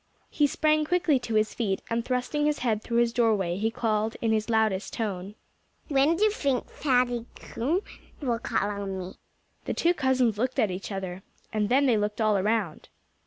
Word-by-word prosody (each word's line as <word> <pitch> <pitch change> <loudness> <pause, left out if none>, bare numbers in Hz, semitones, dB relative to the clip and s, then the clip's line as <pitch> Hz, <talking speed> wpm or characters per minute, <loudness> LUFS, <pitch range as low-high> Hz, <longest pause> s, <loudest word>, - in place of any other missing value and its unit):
He 295 - +3
sprang 310 +1 +2
quickly 330 -3 +2
to 235 -2 -4
his 215 0 +2
feet; 200 -5 -2
and 230 0 -1
thrusting 255 +4 0
his 300 -1 +1
head 220 -3 +1
through 235 +1 -2
his 235 -1 +3
doorway, 210 -7 +1
he 220 +3 +1
called 220 -1 -1
in 225 - 0
his 215 0 0
loudest 220 -3 +1
tone: 200 -3 -4 0.5
"When 285 +3 +3
do 390 - 0
you 430 - +5
think 275 - -1
Fatty 245 -4 +1
Coon 310 +11 -2 0.4
will 240 -5 -1
call 225 -4 -1
on 200 -1 -4
me?" 185 0 -7 0.5
The - - -2
two 345 +1 +3
cousins 260 - +1
looked 255 +2 -1
at 210 - +2
each 185 +3 -6
other. 190 -1 -5 0.3
And 210 -1 0
then 275 +3 +4
they 240 -5 +4
looked 210 +1 -2
all 215 -2 +3
around. 200 -4 -1
230 Hz, 190 wpm, -27 LUFS, 210-265 Hz, 0.5 s, you